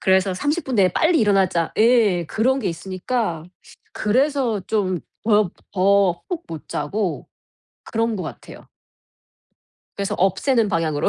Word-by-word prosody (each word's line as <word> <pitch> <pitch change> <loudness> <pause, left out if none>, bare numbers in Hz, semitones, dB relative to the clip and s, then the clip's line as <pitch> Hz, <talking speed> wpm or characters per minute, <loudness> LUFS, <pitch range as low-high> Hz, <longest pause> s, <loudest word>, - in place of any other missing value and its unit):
그래서 190 0 +3
'30 295 - -1
분 260 -4 -2
내에 190 -2 +5
빨리 320 0 +3
일어나자.' 190 -5 +2
예, 215 -7 +4
그런 255 - +1
게 210 - -1
있으니까 185 +1 -3 0.5
그래서 255 -1 +1
좀 185 -5 0 0.2
법 210 -5 +3 0.2
더 195 -2 +2
푹 345 -2 -4
못 160 -2 -8
자고 200 -4 -3 0.6
그런 225 0 -1
것 185 - -4
같아요. - - -10 1.3
그래서 200 -1 -2
없애는 210 +5 +2
방향으로. 165 -5 0
205 Hz, 250 characters per minute, -21 LUFS, 185-235 Hz, 1.3 s, 내에